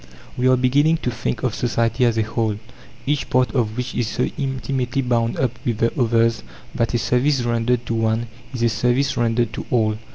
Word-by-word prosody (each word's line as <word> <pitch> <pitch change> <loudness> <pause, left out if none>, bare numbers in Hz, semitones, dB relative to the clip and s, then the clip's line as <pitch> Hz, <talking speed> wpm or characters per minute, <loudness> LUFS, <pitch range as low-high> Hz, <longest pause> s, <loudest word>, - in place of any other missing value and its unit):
We 125 +1 +1
are 130 0 +5
beginning 145 +6 +3
to 125 - 0
think 115 0 -3
of 125 -4 0
society 120 +1 +1
as 115 -1 +1
a 110 - +3
whole, 110 -1 -1 0.5
each 145 0 -1
part 130 -1 +2
of 115 -4 0
which 125 0 -3
is 120 -2 -1
so 125 - -1
intimately 135 -1 -2
bound 115 -2 0
up 130 -3 +1
with 120 -3 -1
the 115 +1 +1
others 115 -2 +2 0.3
that 115 +1 0
a - - +4
service 125 +3 +1
rendered 120 +1 0
to - - -2
one 115 +1 0 0.3
is 125 -3 -3
a 115 - +4
service 125 +5 +1
rendered 115 -1 +1
to - - -5
all. 110 -3 +1
120 Hz, 200 wpm, -21 LUFS, 115-130 Hz, 0.5 s, are